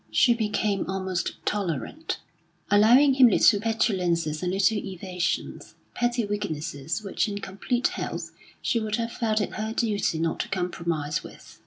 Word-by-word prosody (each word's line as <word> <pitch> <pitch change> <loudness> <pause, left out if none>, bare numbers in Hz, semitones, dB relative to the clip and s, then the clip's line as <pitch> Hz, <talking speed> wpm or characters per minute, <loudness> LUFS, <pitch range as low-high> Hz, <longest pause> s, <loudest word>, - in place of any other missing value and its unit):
She 240 - +4
became 210 -4 -1
almost 190 -2 -2
tolerant, 200 - -2 0.5
allowing 240 +7 +6
him 260 -1 +7
little 205 -1 +5
petulances 180 -8 0
and 180 -1 -1
little 195 +3 +2
evasions 185 -2 -4 0.2
petty 240 -1 0
weaknesses 165 -4 -3
which 200 +3 -1
in 200 - -4
complete 205 +6 -1
health - - -5 0.3
she 235 - +1
would 215 -1 -1
have 230 0 -2
felt 220 -3 0
it - - -3
her 220 +1 -3
duty 210 -8 0
not 165 +1 -1
to - - -2
compromise 170 -5 -2
with. - - -13
205 Hz, 145 wpm, -26 LUFS, 180-225 Hz, 0.5 s, him